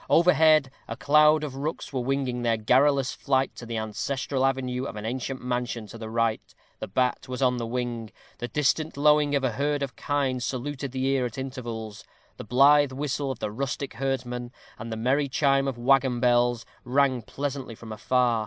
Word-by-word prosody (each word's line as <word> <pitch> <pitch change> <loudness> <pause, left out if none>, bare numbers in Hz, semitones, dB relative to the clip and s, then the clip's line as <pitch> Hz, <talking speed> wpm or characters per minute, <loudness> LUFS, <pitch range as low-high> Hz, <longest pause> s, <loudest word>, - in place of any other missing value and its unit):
Overhead 155 -5 +5 0.2
a - - -6
cloud 150 +1 +5
of 140 -3 -5
rooks 145 +2 -4
were 130 - -1
winging 130 -1 -1
their 115 -1 +1
garrulous 135 +4 +3
flight 135 -1 0
to 120 - -8
the 115 -1 -3
ancestral 130 +5 -1
avenue 130 -1 -2
of 95 - -6
an 105 0 -6
ancient 130 +2 -4
mansion 120 -2 -2
to 105 +2 -10
the 110 -1 -6
right; 115 -1 -1 0.2
the - - -5
bat 125 +6 0
was 125 0 -5
on 125 -2 +2
the 115 -1 -3
wing; 120 -2 -3 0.3
the 120 - -3
distant 150 +4 0
lowing 150 0 +4
of 140 - 0
a 130 - +1
herd 145 +4 -1
of 135 - -5
kine 140 -3 -1
saluted 135 +2 -4
the 130 0 -2
ear 135 -2 +1
at 120 - -11
intervals; 115 -5 -6 0.3
the - - -7
blithe 140 +5 +5
whistle 140 +1 -2
of 130 - -3
the 105 - -4
rustic 135 +3 -4
herdsman, 125 -2 -3 0.3
and 115 0 -6
the 110 - -3
merry 135 +5 +1
chime 135 0 +2
of 135 -3 -3
waggon 130 0 +3
bells, 120 -1 +2 0.2
rang 130 0 +2
pleasantly 135 0 -5
from 110 0 -11
afar. 120 +2 +1
130 Hz, 190 wpm, -26 LUFS, 120-140 Hz, 0.3 s, Overhead